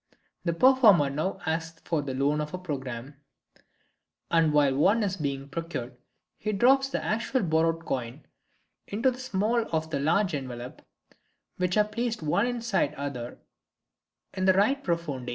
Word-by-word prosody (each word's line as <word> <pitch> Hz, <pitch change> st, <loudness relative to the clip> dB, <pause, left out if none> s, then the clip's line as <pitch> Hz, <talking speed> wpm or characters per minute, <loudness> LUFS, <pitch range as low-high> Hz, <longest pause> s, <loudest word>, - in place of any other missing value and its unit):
The 170 Hz, -, +1 dB
performer 210 Hz, -, +5 dB
now 155 Hz, +7 st, -2 dB
asks 160 Hz, 0 st, -3 dB
for 160 Hz, -3 st, 0 dB
the 135 Hz, -2 st, -4 dB
loan 145 Hz, +3 st, +1 dB
of 150 Hz, +3 st, -4 dB
a -, -, -4 dB
programme, 135 Hz, -6 st, -6 dB, 1.1 s
and 165 Hz, -2 st, +4 dB
while 145 Hz, -3 st, +3 dB
one 200 Hz, +10 st, +3 dB
is 195 Hz, -1 st, -1 dB
being 140 Hz, -3 st, -3 dB
procured 145 Hz, -5 st, -5 dB, 0.4 s
he 215 Hz, -, -2 dB
drops 270 Hz, +6 st, +4 dB
the -, -, -3 dB
actual 230 Hz, +3 st, 0 dB
borrowed 165 Hz, 0 st, +1 dB
coin 125 Hz, +2 st, -4 dB, 0.6 s
into 230 Hz, +6 st, +1 dB
the 250 Hz, -, -9 dB
smallest 225 Hz, -1 st, 0 dB
of 160 Hz, 0 st, -1 dB
the 140 Hz, -, -1 dB
three 170 Hz, +2 st, +1 dB
envelopes 125 Hz, -1 st, -8 dB, 0.7 s
which 180 Hz, +1 st, 0 dB
are 210 Hz, -, +6 dB
placed 230 Hz, -1 st, -3 dB
one 200 Hz, +10 st, +2 dB
inside 235 Hz, -, 0 dB
the -, -, -13 dB
other 125 Hz, -4 st, -5 dB, 1.0 s
in 185 Hz, -, -1 dB
the 190 Hz, -, +6 dB
right 240 Hz, +9 st, +2 dB
profonde. 150 Hz, -8 st, -2 dB
165 Hz, 155 wpm, -27 LUFS, 140-210 Hz, 1.1 s, are